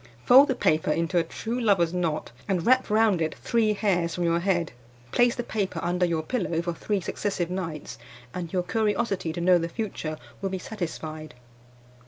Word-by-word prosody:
Fold 270 +3 +8
the 265 - 0
paper 155 -9 +1
into 165 +3 +1
a - - +2
true 230 +8 -4
lover's 185 -7 +3
knot, 165 -7 -2 0.2
and 180 -4 0
wrap 255 0 +4
round 215 -4 +3
it 160 - -1
three 225 -2 +1
hairs 180 -5 0
from 175 - -2
your 170 0 +2
head. 175 -3 0 0.4
Place 240 -1 +3
the 240 - -3
paper 200 -7 -2
under 180 +1 +1
your 165 -2 -1
pillow 180 -5 -1
for 170 0 -2
three 205 +4 -1
successive 180 -1 -2
nights, 165 -5 -5 0.3
and 175 -2 -5
your 180 -2 0
curiosity 205 -2 0
to 165 - -5
know 180 +1 +4
the 165 0 -3
future 165 -6 -4 0.2
will 195 - -1
be 190 - -3
satisfied. 155 - -6
180 Hz, 185 wpm, -26 LUFS, 165-210 Hz, 0.4 s, Fold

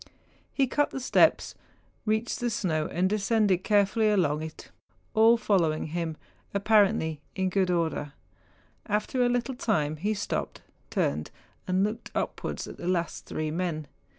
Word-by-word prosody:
He 275 - +2
cut 290 +3 +1
the - - -5
steps, 255 - +3 0.5
reached 220 +2 0
the 245 - 0
snow, 160 -8 -1
and 180 +2 +1
descended 205 -2 +2
carefully 210 +1 +3
along 160 -7 +2
it—all 220 +8 0
following 170 -9 +1
him, 165 -2 -2 0.4
apparently 200 -7 +3
in 190 -1 0
good 190 -1 +1
order. 160 -4 -1 0.7
After 210 +5 0
a 245 - +4
little 245 +2 0
time 155 -11 0
he 210 +7 -1
stopped, 205 - -3 0.3
turned, 75 +2 -1 0.4
and 185 +1 +2
looked 215 +3 -3
upward - - -3
at - - -9
the 175 - -6
last 175 -2 -1
three 155 -1 -3
men. 165 -2 -2
195 Hz, 140 wpm, -28 LUFS, 160-220 Hz, 0.7 s, a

